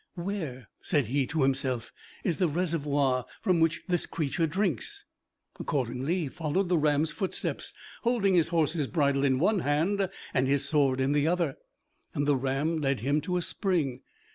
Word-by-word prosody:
"Where," 170 - -4
said 145 -7 +1
he 135 +3 0
to 160 -3 0
himself, 130 -3 0 0.3
"is 175 -5 0
the 180 - +3
reservoir 145 -6 +1 0.2
from 180 -3 +2
which 165 0 +2
this 175 -2 0
creature 160 +1 -1
drinks?" 170 - -2 0.5
Accordingly 135 +6 -1
he 155 - -2
followed 165 +5 -1
the 180 - +3
ram's 150 +1 +2
footsteps, 185 +5 -2 0.3
holding 230 -5 +2
his 170 -3 +4
horse's 160 -3 +1
bridle 140 -3 +1
in 130 -2 +3
one 195 +8 +2
hand 180 +6 +1 0.2
and 130 -1 +2
his 140 0 +2
sword 140 -3 +2
in 135 +1 +2
the 145 +1 +2
other, 170 -5 +1 0.6
and 145 0 0
the 145 - +4
ram 135 +5 0
led 135 -5 0
him 140 +5 +1
to 180 +1 -1
a 175 - -1
spring. 160 - 0
150 Hz, 165 wpm, -29 LUFS, 135-175 Hz, 0.6 s, his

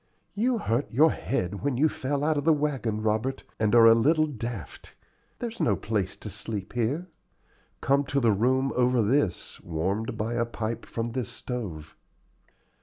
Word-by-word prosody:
"You 240 +4 +1
hurt 125 - -1
your 150 +6 +5
head 100 -6 -2
when 140 -3 -1
you 155 +4 +4
fell 140 -1 -2
out 155 +1 +2
of 145 - -1
the 165 - +4
wagon, 135 -8 -1
Robert, 110 +5 0 0.2
and 110 +1 +2
are 115 -1 +8
a 115 - +9
little 155 +7 +3
daft. 115 - -7 0.4
There's 235 -1 -5
no 105 - +3
place 100 -3 -2
to 105 - -7
sleep 105 -3 -5
here." 125 +9 -1 0.8
"Come 140 +2 +2
to 140 +1 0
the 120 -4 +3
room 130 +6 +1
over 125 -1 +3
this, 110 -4 0
warmed 95 +8 -2
by 115 +2 -2
a 120 0 +1
pipe 115 0 -4
from 115 0 -3
this 125 -2 -3
stove." 95 - -6
120 Hz, 170 wpm, -27 LUFS, 110-140 Hz, 0.8 s, a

